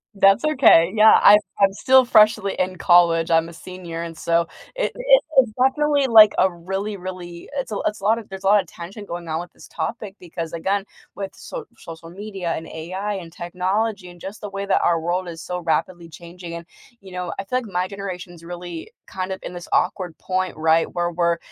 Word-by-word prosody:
That's 195 Hz, +7 st, +4 dB
okay, 230 Hz, -, +5 dB
yeah, 220 Hz, +1 st, +7 dB
I 205 Hz, +1 st, +9 dB, 0.2 s
I'm 195 Hz, -1 st, +4 dB
still 260 Hz, +3 st, +4 dB
freshly 215 Hz, -4 st, +4 dB
in 185 Hz, 0 st, -1 dB
college, 170 Hz, -1 st, +4 dB
I'm 165 Hz, 0 st, +3 dB
a 170 Hz, -, -12 dB
senior, 170 Hz, -1 st, -8 dB
and 165 Hz, -1 st, -7 dB
so, 170 Hz, 0 st, 0 dB, 0.3 s
it -, -, -1 dB
it -, -, +4 dB
it's 250 Hz, -4 st, +5 dB
definitely, 285 Hz, +1 st, +2 dB
like, 215 Hz, -3 st, +8 dB
a 190 Hz, -, +4 dB
really, 195 Hz, +4 st, -4 dB
really 180 Hz, -2 st, -8 dB
it's 265 Hz, -5 st, -3 dB
a 205 Hz, -, -2 dB
it's 210 Hz, -, -3 dB
a -, -, -15 dB
lotta 225 Hz, +2 st, +2 dB
there's 190 Hz, 0 st, -9 dB
a -, -, 0 dB
lotta 200 Hz, -1 st, +4 dB
tension 190 Hz, +6 st, -10 dB
going 175 Hz, -2 st, -7 dB
on 160 Hz, 0 st, -2 dB
with 175 Hz, -, -11 dB
this -, -, -15 dB
topic 215 Hz, -4 st, -5 dB
because, 170 Hz, -2 st, -7 dB
again, 195 Hz, +4 st, -1 dB, 0.3 s
with 195 Hz, -1 st, -5 dB
socia -, -, -8 dB
social 165 Hz, -1 st, -11 dB
media 195 Hz, -3 st, -5 dB
and 160 Hz, -, -6 dB
AI 185 Hz, +6 st, -5 dB
and 170 Hz, -3 st, -8 dB
technology 185 Hz, +3 st, -2 dB
and 175 Hz, -1 st, -15 dB
just 200 Hz, +3 st, -8 dB
the 205 Hz, -, -6 dB
way 195 Hz, 0 st, -4 dB
that -, -, +2 dB
our 170 Hz, -1 st, +2 dB
world 180 Hz, +2 st, -2 dB
is 165 Hz, -1 st, -8 dB
so 180 Hz, +2 st, -4 dB
rapidly 170 Hz, +1 st, -2 dB
changing 170 Hz, +1 st, -10 dB
and, 170 Hz, 0 st, -7 dB, 0.4 s
you 190 Hz, -1 st, -13 dB
know, 180 Hz, -2 st, -4 dB
I -, -, -2 dB
feel 250 Hz, +6 st, -2 dB
like 250 Hz, -, -9 dB
my 180 Hz, -3 st, -2 dB
generation's 185 Hz, -3 st, -8 dB
really 175 Hz, -1 st, -8 dB, 0.2 s
kind 185 Hz, 0 st, -5 dB
of 190 Hz, -, -8 dB
in -, -, -7 dB
this 175 Hz, -1 st, -8 dB
awkward 180 Hz, -4 st, 0 dB
point, 185 Hz, 0 st, -2 dB
right, 160 Hz, +1 st, +2 dB
where 175 Hz, 0 st, -1 dB
we're, 170 Hz, 0 st, +1 dB
185 Hz, 210 wpm, -22 LUFS, 170-205 Hz, 0.4 s, I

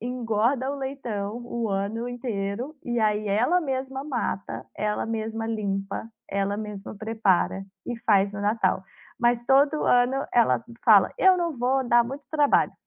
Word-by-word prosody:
engorda 245 Hz, +2 st, 0 dB
o 285 Hz, -, -4 dB
leitão 235 Hz, -6 st, -4 dB
o 235 Hz, -2 st, -3 dB
ano 205 Hz, +5 st, -2 dB
inteiro, 240 Hz, +2 st, -4 dB
e 240 Hz, -1 st, -1 dB
aí 210 Hz, -1 st, +1 dB
ela 250 Hz, -, +3 dB
mesma 265 Hz, -2 st, -3 dB
mata, 240 Hz, -8 st, -3 dB
ela 210 Hz, +1 st, -1 dB
mesma 225 Hz, 0 st, -3 dB
limpa, 200 Hz, -1 st, -3 dB, 0.2 s
ela 200 Hz, +1 st, -1 dB
mesma 210 Hz, -1 st, -6 dB
prepara 205 Hz, -3 st, +1 dB, 0.2 s
e 240 Hz, -, -3 dB
faz 200 Hz, -2 st, +3 dB
no 200 Hz, -, -5 dB
Natal. 205 Hz, -3 st, +1 dB, 0.4 s
Mas 240 Hz, 0 st, +2 dB
todo 280 Hz, +3 st, +3 dB
ano 250 Hz, +3 st, +3 dB
ela 235 Hz, -1 st, +3 dB, 0.2 s
fala: 210 Hz, -5 st, +6 dB
"Eu 375 Hz, -1 st, +6 dB
não 335 Hz, -5 st, -2 dB
vou 260 Hz, +2 st, +1 dB
dá 240 Hz, 0 st, +6 dB
muito 275 Hz, +4 st, -7 dB
trabalho". 295 Hz, -2 st, +3 dB
230 Hz, 150 wpm, -25 LUFS, 210-260 Hz, 0.4 s, fala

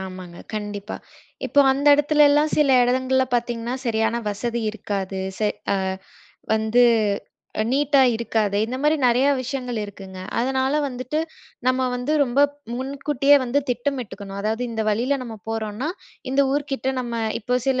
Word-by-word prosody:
ஆமாங்க. 185 Hz, -2 st, -9 dB, 0.2 s
கண்டிப்பா. 205 Hz, -1 st, -5 dB, 0.5 s
இப்போ 285 Hz, -, +4 dB
அந்த 280 Hz, +2 st, -2 dB
இடத்துலல்லாம் 295 Hz, +1 st, +4 dB
சில 295 Hz, -2 st, +4 dB
இடங்கள்ல 260 Hz, +1 st, +2 dB
பாத்தீங்கன்னா, 235 Hz, 0 st, -1 dB
சரியான 225 Hz, 0 st, +1 dB
வசதி 235 Hz, +3 st, -3 dB
இருக்காது. 195 Hz, -3 st, -4 dB, 0.2 s
செ 215 Hz, -, +2 dB, 0.3 s
அ -, -, +1 dB, 0.8 s
வந்து 220 Hz, +2 st, +3 dB, 0.8 s
அ -, -, +3 dB
நீட்டா 280 Hz, 0 st, +3 dB
இருக்காது. 220 Hz, -3 st, 0 dB
இந்தமாரி 270 Hz, +7 st, +1 dB
நெறையா 250 Hz, +3 st, +4 dB
விஷயங்கள் 250 Hz, -2 st, -4 dB
இருக்குங்க. 195 Hz, -2 st, -10 dB, 0.2 s
அதனால 265 Hz, +2 st, +1 dB, 0.2 s
வந்துட்டு, 255 Hz, +3 st, -4 dB, 0.5 s
நம்ம 255 Hz, 0 st, +2 dB
வந்து 250 Hz, +4 st, -2 dB
ரொம்ப 260 Hz, +2 st, +1 dB, 0.3 s
முன்கூட்டியே 275 Hz, +2 st, +2 dB
வந்து 255 Hz, +3 st, +1 dB
திட்டமிட்டுக்கணும். 240 Hz, -6 st, -4 dB
அதாவது 220 Hz, +3 st, -1 dB
இந்த 220 Hz, -1 st, -2 dB
வழியில 250 Hz, +7 st, 0 dB
நம்ம 230 Hz, -3 st, -7 dB
போறோன்னா, 225 Hz, +4 st, -3 dB, 0.4 s
இந்த 270 Hz, +1 st, +2 dB
ஊர்க்கிட்ட 280 Hz, -2 st, -2 dB
நம்ம 240 Hz, -2 st, -5 dB, 0.3 s
இப்போ 250 Hz, +4 st, -1 dB
சில 260 Hz, -1 st, +2 dB
245 Hz, 130 wpm, -23 LUFS, 220-270 Hz, 0.8 s, இப்போ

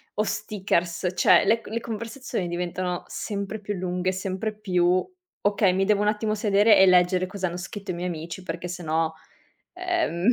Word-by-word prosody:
o 210 Hz, -, +1 dB
stickers, 185 Hz, -5 st, -1 dB
cioè -, -, +5 dB
le 225 Hz, +3 st, +3 dB
c -, -, -14 dB
le 225 Hz, +2 st, -2 dB
conversazioni 230 Hz, -3 st, -4 dB
diventano 180 Hz, +1 st, -3 dB
sempre 205 Hz, 0 st, -4 dB
più 205 Hz, 0 st, -3 dB
lunghe, 180 Hz, 0 st, -1 dB
sempre 190 Hz, +3 st, -3 dB
più 185 Hz, -3 st, +1 dB, 0.4 s
okay, 205 Hz, -2 st, +3 dB
mi 190 Hz, +1 st, +1 dB
devo 205 Hz, 0 st, +3 dB
un 210 Hz, -, +3 dB
attimo 215 Hz, 0 st, -1 dB
sedere 210 Hz, +1 st, +4 dB
e 190 Hz, -, +7 dB
leggere 180 Hz, 0 st, +4 dB
cosa 185 Hz, 0 st, -3 dB
hanno 175 Hz, -, -5 dB
scritto 190 Hz, +2 st, -6 dB
i -, -, -3 dB
miei 175 Hz, +1 st, -3 dB
amici 170 Hz, +2 st, -6 dB
perché 175 Hz, 0 st, -5 dB
se 180 Hz, 0 st, -6 dB
no 160 Hz, 0 st, 0 dB, 0.6 s
ehm 350 Hz, -, -1 dB
190 Hz, 180 wpm, -25 LUFS, 180-210 Hz, 0.6 s, e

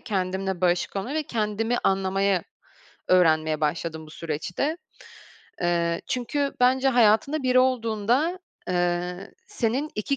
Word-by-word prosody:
kendimle 190 Hz, -3 st, -2 dB
barışık 180 Hz, +2 st, +1 dB
olmaya 240 Hz, +10 st, -3 dB
ve 315 Hz, -, 0 dB
kendimi 225 Hz, -1 st, -1 dB
anlamayı 195 Hz, -1 st, +1 dB, 0.7 s
öğrenmeye 155 Hz, -3 st, +3 dB
başladım 160 Hz, +1 st, -2 dB
bu -, -, -14 dB
süreçte. 170 Hz, -, -3 dB, 0.8 s
Eee, 170 Hz, -1 st, 0 dB
çünkü 275 Hz, +3 st, -1 dB
bence 260 Hz, +2 st, +4 dB
hayatında 245 Hz, +5 st, +3 dB
biri 255 Hz, 0 st, +3 dB
olduğunda, 255 Hz, -, +1 dB, 0.3 s
eee, 180 Hz, +1 st, -1 dB
senin 255 Hz, +7 st, -1 dB
2 245 Hz, +6 st, -1 dB
200 Hz, 110 wpm, -25 LUFS, 175-255 Hz, 0.8 s, bence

